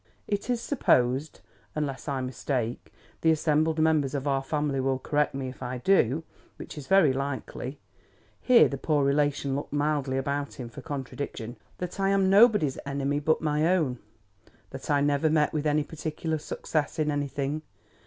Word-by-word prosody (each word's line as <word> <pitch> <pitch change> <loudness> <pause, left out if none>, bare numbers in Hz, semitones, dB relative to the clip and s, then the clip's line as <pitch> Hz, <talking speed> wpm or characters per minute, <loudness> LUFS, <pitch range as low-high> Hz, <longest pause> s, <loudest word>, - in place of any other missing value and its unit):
It 205 +3 -2
is 245 -1 +1
supposed, 140 - +1 0.3
unless 145 -3 -3
I 135 -2 -1
mistake—the 125 +4 -3
assembled 155 0 +2
members 155 -3 +2
of 140 0 -2
our 135 -1 +1
family 145 0 -1
will 130 0 +1
correct 145 +2 0
me 135 -1 -3
if 130 0 -9
I 125 0 -3
do, 150 0 +2 0.3
which - - -9
is 145 -3 -8
very 190 -8 +5
likely 135 0 -4 0.6
(here 250 -2 +6
the 140 - -5
poor 145 -2 +1
relation 140 -1 +1
looked 145 - -4
mildly 145 -2 0
about 140 +1 -2
him 120 -3 -7
for - - -10
contradiction); 135 -5 -5 0.2
that 180 +2 -6
I 195 0 +2
am 195 -1 +3
nobody's 205 - +5
enemy 140 +1 -1
but 155 +2 +1
my 150 +1 +2
own. 155 -9 +1 0.7
That - - -8
I 145 -1 +3
never 145 +2 +2
met 150 -1 +2
with 155 0 0
any 150 0 +2
particular 160 +1 -4
success 150 +1 -2
in 155 -1 +1
anything. 145 +1 -2
145 Hz, 165 wpm, -27 LUFS, 135-155 Hz, 0.7 s, here